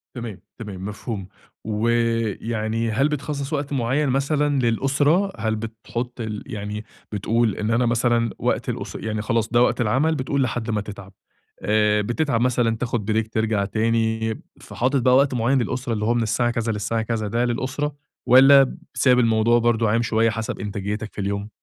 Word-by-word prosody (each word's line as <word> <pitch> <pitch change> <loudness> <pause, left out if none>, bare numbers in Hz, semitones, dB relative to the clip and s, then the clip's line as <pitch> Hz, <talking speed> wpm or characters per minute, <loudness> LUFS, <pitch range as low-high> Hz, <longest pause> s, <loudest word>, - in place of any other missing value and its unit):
تمام، 115 -6 -6 0.2
تمام 100 -5 -7
مفهوم، 105 -1 -5 0.4
و 110 +1 -1 0.5
يعني 115 0 -1
هل 135 +7 +2
بتخصص 145 0 -3
وقت 145 -1 -2
معين 135 +3 +1
مثلًا 140 +2 +1
للأسرة؟ 140 - +2
هل 110 0 -1
بتحط 115 +2 -5
ال 110 -2 -4
يعني 105 +1 -5 0.3
بتقول 110 +1 +1
إن 105 +1 -2
أنا 120 +2 +2
مثلًا 115 0 +2
وقت - - -1
الأس - - -5
يعني 110 -1 -3
خلاص 115 +1 0
ده 120 +1 +3
وقت 125 - +2
العمل 135 +9 +2
بتقول 135 0 0
لحد 120 -1 -2
ما 105 -2 0
تتعب، 100 -2 -10 0.5
آآ، 105 0 +2
بتتعب 120 +2 0
مثلًا 120 -2 +2
تاخد 115 -3 -2
بريك 110 0 0
ترجع 110 -2 +1
تاني، 110 +1 0 0.2
فحاطط 130 +2 -1
بقى 125 +1 +4
وقت 135 0 +4
معين 125 +2 +2
للأسرة 125 0 -2
اللي 105 0 -2
هو 115 - +2
من 120 -1 +1
الساعة 120 +2 +1
كذا 115 -1 -1
للساعة 110 +2 -1
كذا 110 -1 -2
ده 115 +4 0
للأسرة؟ 135 +4 -2 0.3
والّا 135 +2 +6 0.2
سايب 125 -2 +4
الموضوع 115 0 +3
برضه 115 -1 +2
عايم 115 +2 +2
شوية 115 0 +2
حسب 110 -1 -4
إنتاجيتك 105 +1 -4
في - - -5
اليوم؟ 100 +1 -3
115 Hz, 170 wpm, -23 LUFS, 110-125 Hz, 0.5 s, والّا